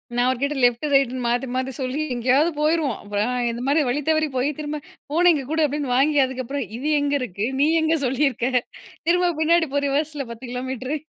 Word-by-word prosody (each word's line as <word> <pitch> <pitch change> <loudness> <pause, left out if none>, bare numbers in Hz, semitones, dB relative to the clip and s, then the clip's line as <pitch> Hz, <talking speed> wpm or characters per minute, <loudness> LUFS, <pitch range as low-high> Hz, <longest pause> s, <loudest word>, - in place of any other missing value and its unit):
நான் 245 0 +2
அவர் 255 -1 +1
கிட்ட 280 +1 0
லெஃப்ட் 245 +3 +3
ரைட்ன்னு 260 -2 +2
மாத்தி 245 +3 0
மாத்தி 260 +1 -1
சொல்லி 260 +3 -2
எங்கேயாவது 260 +7 +2
போயிருவோம். 305 -1 +1
அப்புறம் 205 +3 -1 0.2
இந்த 235 +1 -6
மாதிரி 295 +3 +3
வழி 275 +4 0
தவறி 310 0 +2
போய் 255 +3 +1
திரும்ப 300 0 -3 0.3
"போன 345 +4 +3
இங்க 290 -3 -2
கூடு" 315 +1 +1
அப்டின்னு 285 -3 -2
வாங்கி 290 +2 +3
அதுக்கப்புறம் 260 +2 -4
"இது 270 +5 -4
எங்க 285 0 0
இருக்கு 215 -2 -3
நீ 285 - +5 0.2
எங்க 315 +1 +2
சொல்லியிருக்க? 260 -1 0 0.6
திரும்ப 355 0 +3
பின்னாடி 325 +1 +3
போ 285 - +2
ரிவர்ஸில 290 0 -1
10 235 +3 -9
கிலோமீட்டர்." 260 +3 -3
275 Hz, 190 wpm, -23 LUFS, 250-300 Hz, 0.6 s, நீ